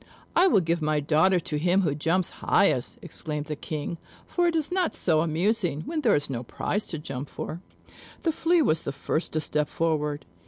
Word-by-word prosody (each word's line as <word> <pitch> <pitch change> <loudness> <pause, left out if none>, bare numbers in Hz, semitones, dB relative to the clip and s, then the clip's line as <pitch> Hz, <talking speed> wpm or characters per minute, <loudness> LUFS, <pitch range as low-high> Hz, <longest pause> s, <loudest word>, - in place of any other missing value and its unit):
"I 360 +3 +6
will 205 - +4
give 170 0 0
my 155 0 +1
daughter 160 +5 +3
to 150 -2 -3
him 180 +4 +3
who 160 -7 +1
jumps 165 +5 0
highest," - - +2
exclaimed 150 -1 -4
the 150 0 -4
King; 155 +3 -5 0.3
"for 350 -1 +1
it 335 - +1
is 315 +1 0
not 365 -1 +1
so 160 -3 +2
amusing 170 0 +1
where 315 - -3
there 235 -7 +4
is 145 0 0
no 125 -3 -3
prize 205 - -2
to 165 - -3
jump 140 -2 -6
for." 165 +3 -6 0.6
The 330 - +2
Flea 330 +1 +2
was 160 - +2
the 140 - -4
first 155 +4 -2
to 155 - +2
step 150 0 0
forward. 150 -3 -1
160 Hz, 200 wpm, -26 LUFS, 150-195 Hz, 0.6 s, I